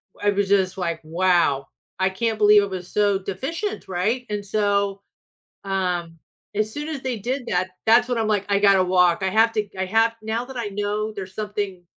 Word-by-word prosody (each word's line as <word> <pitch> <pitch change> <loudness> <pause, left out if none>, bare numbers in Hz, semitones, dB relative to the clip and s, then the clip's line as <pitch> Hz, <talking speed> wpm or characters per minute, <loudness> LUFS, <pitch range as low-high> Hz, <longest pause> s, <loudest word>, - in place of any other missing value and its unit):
W 205 0 +1
I - - -10
was 200 -1 0
just, 190 -2 +2
like, 170 -3 -2
wow, 165 -4 +2 0.3
I 190 0 +3
can't 220 +3 -1
believe 210 -1 +6
it 200 - -3
was 185 -2 -6
so 205 -2 +2
deficient, 270 - -4
right? 210 +8 -1
And 205 -1 -3
so, 200 -1 0 0.6
um, 180 -4 -2 0.4
as 215 +1 0
soon 295 +1 -4
as 285 -4 -4
they 255 -3 -2
did 250 +5 -3
that, 180 +1 0 0.2
that's 235 +2 +5
when 245 -1 -1
I'm, 225 -1 0
like, 205 -2 +1
I 200 0 +3
gotta 200 -2 +5
walk. 180 -2 +3
I 190 - +1
have 225 +4 +4
to 215 - +1
g 205 - -20
I 190 - -1
have 225 +4 +2
now 220 +2 -2
that 265 0 -9
I 235 - -2
know 205 +2 -2
there's 190 -2 -8
something, 205 -4 -4
200 Hz, 210 wpm, -23 LUFS, 185-220 Hz, 0.6 s, believe